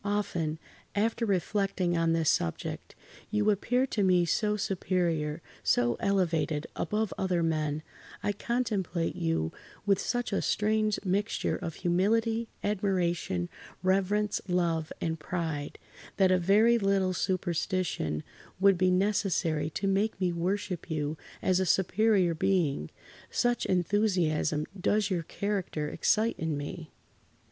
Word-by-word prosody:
Often, 175 Hz, -6 st, -1 dB, 0.4 s
after 225 Hz, +2 st, +1 dB
reflecting 195 Hz, -2 st, 0 dB
on 165 Hz, -1 st, +2 dB
this 165 Hz, -1 st, +1 dB
subject, 80 Hz, -, -3 dB, 0.3 s
you 210 Hz, 0 st, +2 dB
appear 245 Hz, +6 st, +1 dB
to 230 Hz, -5 st, -2 dB
me 180 Hz, -2 st, +4 dB
so 210 Hz, +4 st, +1 dB
superior, 170 Hz, -5 st, -1 dB, 0.2 s
so 120 Hz, -1 st, +2 dB
elevated 165 Hz, -6 st, +1 dB
above 215 Hz, -1 st, -1 dB
other 180 Hz, -3 st, +1 dB
men—I 155 Hz, +5 st, -3 dB
contemplate 205 Hz, -7 st, -1 dB
you 80 Hz, -1 st, 0 dB, 0.3 s
with 200 Hz, -2 st, +3 dB
such 245 Hz, -3 st, -1 dB
a -, -, +1 dB
strange 215 Hz, 0 st, +1 dB
mixture 200 Hz, +4 st, 0 dB
of 165 Hz, -3 st, -5 dB
humility, 225 Hz, +6 st, +1 dB, 0.2 s
admiration, 180 Hz, -, 0 dB, 0.4 s
[Pg -, -, -8 dB, 0.2 s
71]reverence, 210 Hz, 0 st, 0 dB
love, 170 Hz, -3 st, 0 dB
and 160 Hz, -1 st, -2 dB
pride, 160 Hz, -3 st, -3 dB, 0.4 s
that 190 Hz, -2 st, +4 dB
a 185 Hz, -, +4 dB
very 215 Hz, +6 st, +4 dB
little 195 Hz, -2 st, +2 dB
superstition 175 Hz, -, -1 dB, 0.4 s
would 195 Hz, -2 st, +5 dB
be 185 Hz, 0 st, +4 dB
necessary 180 Hz, -5 st, +1 dB
to 195 Hz, +5 st, -4 dB
make 195 Hz, +2 st, +1 dB
me 180 Hz, -2 st, +1 dB
worship 180 Hz, +1 st, -2 dB
you 155 Hz, -1 st, -1 dB, 0.3 s
as 185 Hz, -1 st, +3 dB
a 190 Hz, -, +1 dB
superior 190 Hz, 0 st, +3 dB
being, 160 Hz, -, +1 dB, 0.4 s
such 240 Hz, -1 st, +1 dB
enthusiasm 175 Hz, -5 st, +1 dB
does 205 Hz, +2 st, +1 dB
your 175 Hz, -2 st, +1 dB
character 180 Hz, -4 st, -3 dB
excite 225 Hz, +2 st, +1 dB
in 160 Hz, -3 st, -1 dB
me. 155 Hz, +2 st, -6 dB
185 Hz, 125 wpm, -29 LUFS, 165-205 Hz, 0.4 s, would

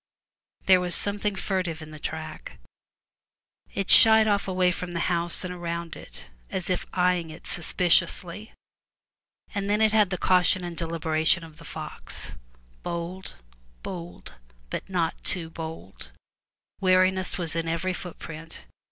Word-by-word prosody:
There 185 Hz, -1 st, +6 dB
was 180 Hz, -1 st, -1 dB
something 205 Hz, 0 st, 0 dB
furtive 185 Hz, -4 st, -2 dB
in 155 Hz, -1 st, -10 dB
the 155 Hz, -, -10 dB
track; 160 Hz, -, -6 dB, 1.1 s
it 195 Hz, -2 st, 0 dB
shied 220 Hz, -1 st, +10 dB
off 205 Hz, -2 st, +1 dB
away 185 Hz, -1 st, +2 dB
from 180 Hz, -1 st, -5 dB
the 170 Hz, -, -1 dB
house 170 Hz, 0 st, 0 dB
and 180 Hz, 0 st, -4 dB
around 170 Hz, -1 st, -5 dB
it, -, -, -11 dB, 0.2 s
as 185 Hz, 0 st, -2 dB
if 180 Hz, -, -1 dB
eying 180 Hz, -2 st, +2 dB
it 160 Hz, +2 st, -11 dB
suspiciously; 180 Hz, +3 st, +1 dB, 1.0 s
and 200 Hz, -2 st, -2 dB
then 210 Hz, +1 st, +2 dB
it 220 Hz, -1 st, +3 dB
had 210 Hz, -3 st, +4 dB
the 180 Hz, -, -2 dB
caution 180 Hz, 0 st, +3 dB
and 175 Hz, -1 st, -5 dB
deliberation 165 Hz, +1 st, +1 dB
of 160 Hz, -2 st, -13 dB
the -, -, -12 dB
fox -, -, -8 dB, 0.3 s
— -, -, -31 dB
bold, 170 Hz, -, -5 dB, 0.5 s
bold, 175 Hz, -2 st, -8 dB, 0.4 s
but -, -, -5 dB
not 170 Hz, -3 st, -1 dB
too 165 Hz, -3 st, -1 dB
bold; 160 Hz, -, -8 dB, 0.7 s
wariness 185 Hz, 0 st, +2 dB
was 170 Hz, -3 st, -2 dB
in 165 Hz, 0 st, -1 dB
every 170 Hz, +3 st, -1 dB
footprint. 165 Hz, -, -9 dB
175 Hz, 145 wpm, -26 LUFS, 165-185 Hz, 1.1 s, shied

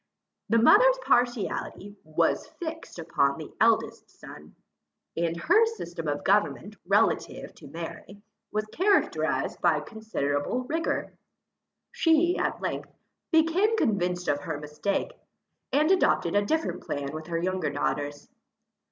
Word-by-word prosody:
The 230 Hz, -, +4 dB
mother's -, -, +6 dB
partiality 235 Hz, -4 st, 0 dB
was 155 Hz, 0 st, 0 dB
fixed 325 Hz, -, -6 dB
upon 140 Hz, -4 st, 0 dB
the -, -, -9 dB
eldest -, -, +2 dB
son, 75 Hz, +1 st, -13 dB, 0.6 s
and 165 Hz, 0 st, -1 dB
her 425 Hz, -, +4 dB
system 170 Hz, -, -6 dB
of 145 Hz, 0 st, -2 dB
government 205 Hz, +1 st, +1 dB
relative 205 Hz, +3 st, +1 dB
to -, -, -14 dB
Mary, 170 Hz, +4 st, -8 dB, 0.3 s
was 215 Hz, 0 st, -1 dB
characterized 400 Hz, -, +1 dB
by -, -, +3 dB
considerable 215 Hz, -, -2 dB
rigour. 320 Hz, +5 st, -2 dB, 0.8 s
She, 330 Hz, +2 st, +3 dB
at -, -, -1 dB
length, -, -, -3 dB, 0.4 s
became 345 Hz, +7 st, +3 dB
convinced 180 Hz, -, 0 dB
of 145 Hz, -, +1 dB
her 155 Hz, -1 st, -4 dB
mistake, 150 Hz, -, -2 dB, 0.6 s
and 305 Hz, +5 st, +3 dB
adopted 205 Hz, -, +2 dB
a 205 Hz, -, +4 dB
different 320 Hz, +7 st, -1 dB
plan 140 Hz, 0 st, -4 dB
with 155 Hz, 0 st, -7 dB
her 170 Hz, -1 st, -2 dB
younger 185 Hz, +2 st, -1 dB
daughters. 145 Hz, 0 st, -3 dB
205 Hz, 125 wpm, -27 LUFS, -, 0.8 s, mother's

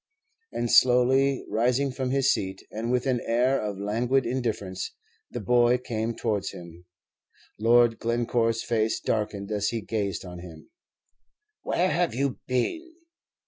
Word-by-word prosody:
And 120 Hz, -, -2 dB
slowly 130 Hz, +2 st, +4 dB
rising 125 Hz, +5 st, +1 dB
from 130 Hz, 0 st, -3 dB
his 135 Hz, 0 st, +3 dB
seat, 95 Hz, 0 st, -5 dB
and 115 Hz, +3 st, -3 dB
with 125 Hz, -1 st, +1 dB
an 125 Hz, -3 st, 0 dB
air 125 Hz, +4 st, +2 dB
of 105 Hz, -2 st, -4 dB
languid 120 Hz, +6 st, 0 dB
indifference, 110 Hz, -7 st, -3 dB, 0.3 s
the -, -, -5 dB
boy 120 Hz, 0 st, +3 dB
came 115 Hz, -2 st, -3 dB
towards 105 Hz, -4 st, -2 dB
him. 85 Hz, 0 st, -12 dB, 0.7 s
Lord 115 Hz, +1 st, +4 dB
Glencore's 115 Hz, -1 st, 0 dB
face 110 Hz, -1 st, 0 dB
darkened 105 Hz, -2 st, -2 dB
as 105 Hz, -1 st, 0 dB
he 115 Hz, 0 st, -2 dB
gazed 100 Hz, -4 st, -3 dB
on 90 Hz, -1 st, -8 dB
him. 85 Hz, -3 st, -12 dB, 0.9 s
"Where 185 Hz, +2 st, 0 dB
have 175 Hz, -6 st, 0 dB
you 135 Hz, 0 st, -1 dB
been?" 325 Hz, -, -2 dB
115 Hz, 140 wpm, -26 LUFS, 105-125 Hz, 0.9 s, slowly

